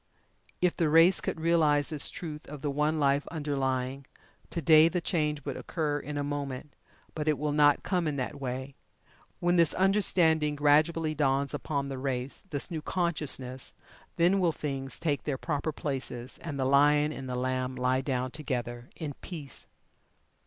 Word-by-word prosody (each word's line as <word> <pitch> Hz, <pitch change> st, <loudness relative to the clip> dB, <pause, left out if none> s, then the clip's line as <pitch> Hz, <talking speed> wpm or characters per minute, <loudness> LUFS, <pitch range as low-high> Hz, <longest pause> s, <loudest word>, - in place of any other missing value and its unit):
If 180 Hz, -1 st, +2 dB
the 165 Hz, -3 st, +1 dB
race 165 Hz, +4 st, +6 dB
could -, -, -3 dB
realize 155 Hz, -3 st, +3 dB
this 150 Hz, -3 st, -2 dB
truth 155 Hz, -3 st, -7 dB
of 145 Hz, 0 st, -9 dB
the 145 Hz, -, 0 dB
One 150 Hz, +2 st, +1 dB
Life 140 Hz, 0 st, +2 dB
underlying, 135 Hz, -3 st, -2 dB, 0.4 s
to 170 Hz, -, -3 dB
day, 155 Hz, +1 st, +6 dB
the 180 Hz, -, -1 dB
Change 150 Hz, -5 st, -1 dB
would 140 Hz, -, -3 dB
occur 150 Hz, -3 st, -2 dB
in 145 Hz, 0 st, -6 dB
a 145 Hz, -, -1 dB
moment, 140 Hz, -1 st, -4 dB, 0.4 s
but 155 Hz, -1 st, -4 dB
it 155 Hz, -2 st, +3 dB
will 150 Hz, 0 st, -1 dB
not 145 Hz, -1 st, +4 dB
come 180 Hz, -4 st, 0 dB
in 150 Hz, -, -1 dB
that 135 Hz, +1 st, -4 dB
way. 130 Hz, +1 st, -4 dB, 0.7 s
When 175 Hz, 0 st, +2 dB
this 170 Hz, -2 st, +4 dB
understanding 170 Hz, -6 st, +3 dB
gradually 155 Hz, +2 st, +3 dB
dawns 140 Hz, -2 st, +1 dB
upon 140 Hz, -2 st, -2 dB
the 135 Hz, -1 st, -5 dB
race 130 Hz, +2 st, -3 dB
this 145 Hz, +2 st, 0 dB
new 160 Hz, -2 st, -3 dB
consciousness 150 Hz, -7 st, -2 dB, 0.4 s
then 180 Hz, +4 st, +3 dB
will 175 Hz, -3 st, +3 dB
Things 135 Hz, -3 st, -4 dB
take 150 Hz, -4 st, -1 dB
their 145 Hz, -3 st, -1 dB
proper 150 Hz, +1 st, -2 dB
places, 130 Hz, -4 st, -4 dB
and 150 Hz, -5 st, -5 dB
the 130 Hz, -, +1 dB
Lion 145 Hz, +2 st, +4 dB
and 135 Hz, -3 st, -7 dB
the 125 Hz, -, -2 dB
Lamb 130 Hz, 0 st, -1 dB
lie 130 Hz, +1 st, +1 dB
down 130 Hz, -2 st, -2 dB
together 120 Hz, -4 st, -4 dB
in 150 Hz, -4 st, -5 dB
peace. 150 Hz, -8 st, -8 dB
145 Hz, 170 wpm, -29 LUFS, 135-160 Hz, 0.7 s, race